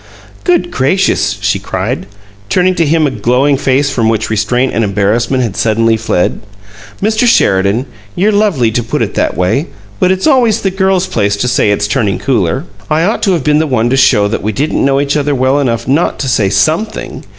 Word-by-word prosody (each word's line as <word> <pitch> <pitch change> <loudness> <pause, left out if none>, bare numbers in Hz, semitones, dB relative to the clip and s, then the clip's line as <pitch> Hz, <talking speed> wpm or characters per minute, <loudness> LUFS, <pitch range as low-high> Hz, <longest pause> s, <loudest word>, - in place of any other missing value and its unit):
"Good 350 -1 +1
gracious!" 185 +9 0
she - - 0
cried, - - -4 0.4
turning 185 0 +2
to 170 -2 0
him 160 +1 +2
a 140 - 0
glowing 125 +5 +1
face 135 +1 0
from 115 -4 0
which 110 0 -1
restraint 120 +5 0
and 115 - 0
embarrassment 110 +6 0
had 110 -5 -3
suddenly 115 +1 +1
fled. 110 -5 -1 0.6
"Mr. 220 +3 +1
Sheridan, 100 - +2 0.3
you're 205 +4 +2
lovely 200 - +1
to 120 - -1
put 115 - -2
it - - -4
that - - -1
way. 95 - 0 0.3
But 185 - +2
it's 190 0 -1
always 245 -7 +3
the 195 - -1
girl's 190 -1 +1
place 100 - -1
to 125 - -1
say 120 -3 +1
it's 105 0 0
turning 105 -2 0
cooler! 125 - -1 0.2
I 155 +1 +1
ought 210 +6 0
to 195 -4 +2
have 165 -6 -1
been 150 +1 +2
the 160 - 0
one 120 -3 0
to - - +2
show 110 -6 +3
that 115 - -3
we 110 - -2
didn't 145 +8 -1
know 135 0 +2
each 140 +1 -1
other 145 -1 0
well 130 +2 +1
enough 115 -4 -1
not 145 +6 +1
to 135 - -2
say 110 -6 +1
SOMETHING! 155 - -1
130 Hz, 205 wpm, -12 LUFS, 110-165 Hz, 0.6 s, always